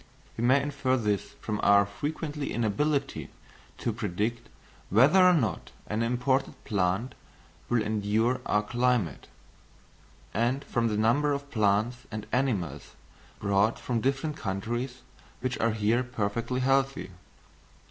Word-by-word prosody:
We 115 Hz, -, -3 dB
may 130 Hz, +3 st, +5 dB
infer 140 Hz, -2 st, 0 dB
this 105 Hz, -4 st, -1 dB
from 105 Hz, -1 st, -3 dB
our 100 Hz, 0 st, +5 dB
frequent 145 Hz, +8 st, -4 dB
inability 140 Hz, +1 st, -1 dB, 0.5 s
to 115 Hz, -, -2 dB
predict 105 Hz, +2 st, -2 dB, 0.4 s
whether 140 Hz, -, +6 dB
or 180 Hz, -, +7 dB
not 135 Hz, -10 st, 0 dB, 0.2 s
an 105 Hz, +2 st, -2 dB
imported 125 Hz, +3 st, +1 dB
plant 100 Hz, +4 st, 0 dB, 0.6 s
will 120 Hz, -2 st, +2 dB
endure 110 Hz, +4 st, +1 dB
our 105 Hz, 0 st, +2 dB
climate, 120 Hz, -, 0 dB, 1.1 s
and 120 Hz, +6 st, +1 dB
from 120 Hz, -1 st, 0 dB
the 105 Hz, -2 st, -1 dB
number 140 Hz, +7 st, +3 dB
of 140 Hz, 0 st, -5 dB
plants 110 Hz, +2 st, +2 dB
and 110 Hz, -1 st, -5 dB
animals 125 Hz, -, -1 dB, 0.4 s
brought 100 Hz, +2 st, +2 dB
from 120 Hz, -3 st, -2 dB
different 140 Hz, +4 st, -1 dB
countries 120 Hz, +6 st, -3 dB, 0.4 s
which 130 Hz, 0 st, -2 dB
are 115 Hz, -1 st, +2 dB
here 110 Hz, +3 st, +2 dB
perfectly 120 Hz, +1 st, -2 dB
healthy. 135 Hz, -5 st, +1 dB
120 Hz, 125 wpm, -28 LUFS, 105-135 Hz, 1.1 s, or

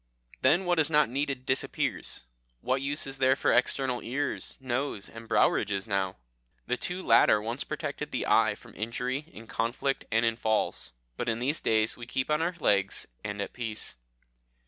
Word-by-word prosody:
Then 160 Hz, +9 st, +4 dB
what 175 Hz, -2 st, +2 dB
is 155 Hz, -1 st, +3 dB
not 150 Hz, -4 st, +4 dB
needed 135 Hz, -1 st, -2 dB
disappears. 130 Hz, -, -1 dB, 0.4 s
What 130 Hz, +1 st, 0 dB
use 145 Hz, +2 st, -1 dB
is 135 Hz, -1 st, -4 dB
there 130 Hz, 0 st, +5 dB
for -, -, +2 dB
external 130 Hz, 0 st, +2 dB
ears, 140 Hz, +4 st, -3 dB
nose, 130 Hz, -4 st, -2 dB
and 115 Hz, 0 st, -10 dB
brow -, -, +5 dB
ridges 100 Hz, -1 st, -1 dB
now? 95 Hz, -3 st, -1 dB, 0.5 s
The -, -, 0 dB
two 180 Hz, +7 st, -4 dB
latter 105 Hz, -, +6 dB
once 115 Hz, +5 st, -3 dB
protected -, -, -4 dB
the -, -, -2 dB
eye -, -, +4 dB
from -, -, -16 dB
injury 125 Hz, +5 st, -2 dB
in 115 Hz, -, -11 dB
conflict 120 Hz, +5 st, -1 dB
and 115 Hz, +2 st, +3 dB
in 115 Hz, 0 st, +1 dB
falls, 110 Hz, -, 0 dB, 0.3 s
but 120 Hz, -, -1 dB
in 110 Hz, -, +1 dB
these 135 Hz, +6 st, -1 dB
days 110 Hz, 0 st, +2 dB
we 120 Hz, -1 st, -8 dB
keep 130 Hz, +3 st, -1 dB
on 150 Hz, +1 st, +2 dB
our 170 Hz, +2 st, 0 dB
legs, 100 Hz, -8 st, +2 dB, 0.2 s
and 100 Hz, -1 st, -4 dB
at -, -, -8 dB
peace. 115 Hz, -, -4 dB
125 Hz, 180 wpm, -29 LUFS, 110-140 Hz, 0.5 s, latter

